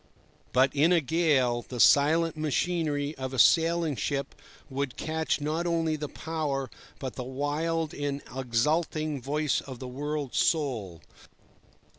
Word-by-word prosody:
But 130 +2 +3
in 155 +5 +4
a 175 - +5
gale, 140 -5 +2
the 125 +1 -8
silent 160 +6 +5
machinery 155 -1 -1
of 130 0 -4
a - - -5
sailing 165 +3 +4
ship 140 +2 -2 0.3
would 135 -2 -3
catch 160 0 -1
not 155 +4 -1
only 165 -2 +1
the 150 -1 -5
power, 145 -6 -3 0.3
but 130 -2 -5
the 125 - -5
wild 150 +5 -2
and 145 -1 -3
exulting 150 +4 0
voice 145 +2 0
of 130 -2 -9
the 130 - -7
world's 145 +1 -3
soul. 115 - 0
145 Hz, 135 wpm, -28 LUFS, 130-160 Hz, 0.3 s, a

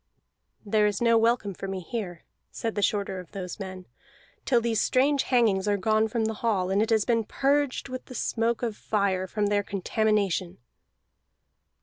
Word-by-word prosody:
"There 210 0 +3
is 205 -2 -1
no 230 -1 +4
welcome 225 -3 +2
for 195 - -7
me 190 -1 -3
here," 180 -3 -5 0.3
said 225 -1 -4
the 205 - -2
shorter 200 -2 0
of 180 - -12
those 185 -2 -6
men, 185 -2 -7 0.6
"till 245 -3 +4
these 230 -2 0
strange 275 +2 +3
hangings 220 -6 +2
are 205 0 +2
gone 215 +3 +2
from 220 0 -1
the 220 - -1
hall, 195 -5 +1
and 200 +2 +2
it 220 - 0
has 220 -2 +3
been 230 -2 +2
purged 280 +4 0
with 255 -1 -7
the 255 - -10
smoke 230 +1 -1
of 225 -3 -1
fire 195 -4 0
from 210 +2 -1
their 205 0 +2
contamination." 200 -2 0
215 Hz, 180 wpm, -27 LUFS, 195-230 Hz, 0.6 s, no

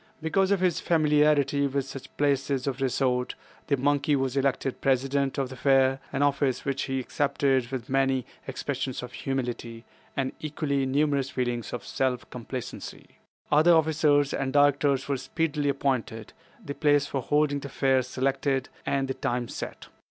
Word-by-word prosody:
Because 190 +4 +1
of 200 -2 +2
his 180 -3 +2
familiarity 150 -3 +3
with 140 -1 -1
such 135 -1 -10
places 140 -2 +1
of 135 -1 -3
resort, 125 -1 0 0.3
the 140 - +2
monkey 145 +2 +2
was 135 -1 -1
elected 135 -1 0
President 135 +1 +1
of 135 -2 -1
the 130 - -8
Fair, 135 0 +3
an 140 +1 0
office 140 -2 +1
which 140 0 -1
he 135 0 -2
accepted 135 -1 +1
with 125 -3 -5
many 135 -1 +1 0.2
expressions 130 -1 -3
of 125 - -7
humility, 120 -3 -4 0.3
and 135 -1 0
equally 140 -3 -1
numerous 140 0 +1
feelings 120 -3 -2
of 120 - -5
self 130 -2 -1
complacency. 125 +1 -7 0.3
Other 160 +3 +6
officers 150 -3 +3
and 135 -1 -1
directors 145 -1 +3
were 140 -1 0
speedily 145 +2 -1
appointed, 130 -6 -2 0.3
the 140 - -4
place 145 -1 +3
for 140 -2 -3
holding 145 +2 +1
the 140 - -7
Fair 135 0 +2
selected, 135 +1 -1 0.2
and 135 -1 +1
the 135 - -1
time 120 -1 -2
set. - - -7
135 Hz, 155 wpm, -27 LUFS, 130-145 Hz, 0.3 s, Other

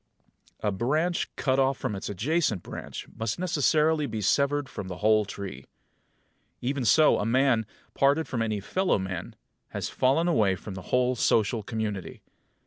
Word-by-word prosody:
A 105 - 0
branch 155 - 0
cut 130 -1 +1
off 135 0 +2
from 105 - -3
its 95 - -5
adjacent 115 - 0
branch - - -7
must 110 -1 -2
necessarily 155 -3 +2
be 110 - -4
severed 140 +7 +1
from 100 -7 -7
the 90 -1 -6
whole 110 0 +3
tree. 95 -9 -7 0.9
Even 130 +1 -2
so 155 +7 +5
a - - 0
man, 120 -2 +2 0.3
parted 140 +4 +2
from 120 -3 -2
any 110 -2 -1
fellow 190 - +1
man, 95 -3 -5 0.3
has - - -4
fallen 140 +7 +2
away 105 - +3
from 95 +2 -8
the 95 - -7
whole 125 0 +2
social 110 -1 +2
community. 105 -3 -4
120 Hz, 155 wpm, -27 LUFS, 105-145 Hz, 0.9 s, so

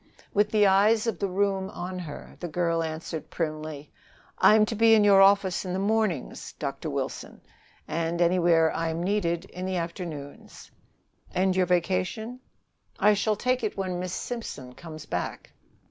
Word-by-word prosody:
With 205 +1 +3
the 210 -1 +4
eyes 210 +3 +4
of 230 - -2
the 200 - 0
room 195 0 0
on 185 -1 -6
her, 155 -5 -8
the 175 - -4
girl 170 0 0
answered 160 0 -5
primly: 155 -2 -4 0.5
"I'm 215 0 +6
to 220 - -4
be 225 +1 +5
in 215 - +4
your 200 -1 +6
office 195 -2 +4
in 180 -2 -4
the - - -1
mornings, 200 - -1
Dr. - - -4
Wilson, - - -4 0.5
and 165 +2 -2
anywhere 170 -2 +3
I 165 0 -1
am 165 +1 -3
needed 180 -3 0
in 185 -1 -8
the 190 - -2
afternoons." 165 -4 -7 0.6
"And 185 0 +2
your 185 -1 +2
vacation?" 185 +7 -1 0.6
"I 210 - +5
shall 210 +1 +1
take 250 +3 0
it 215 - -2
when 185 -2 -2
Miss 180 0 -4
Simpson 185 - -6
comes 155 0 -10
back." 90 - -4
185 Hz, 160 wpm, -27 LUFS, 165-205 Hz, 0.6 s, I'm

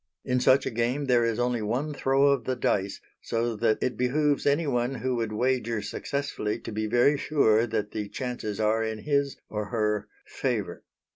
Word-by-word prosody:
In 125 -1 +1
such 130 +2 +4
a - - -2
game 120 +5 0
there 125 -3 +3
is 115 -1 0
only 120 -1 0
one 125 +8 -2
throw 135 0 +2
of 140 - 0
the 130 - 0
dice, 100 -5 0 0.2
so 115 0 -1
that 110 0 +2
it 125 -4 -1
behoves 145 +4 +1
anyone 135 -4 +1
who 130 -1 -1
would 115 -2 -2
wager 115 0 0
successfully 140 -2 -3
to - - -7
be 110 0 -2
very 125 +6 +3
sure 115 -7 +3
that 110 -2 -2
the 105 -2 -4
chances 120 -5 -4
are 110 +1 +2
in 110 -1 -4
his 140 -2 0
or 105 -1 -3
her 105 -1 -1 0.2
favour. - - -3
120 Hz, 185 wpm, -27 LUFS, 110-135 Hz, 0.2 s, such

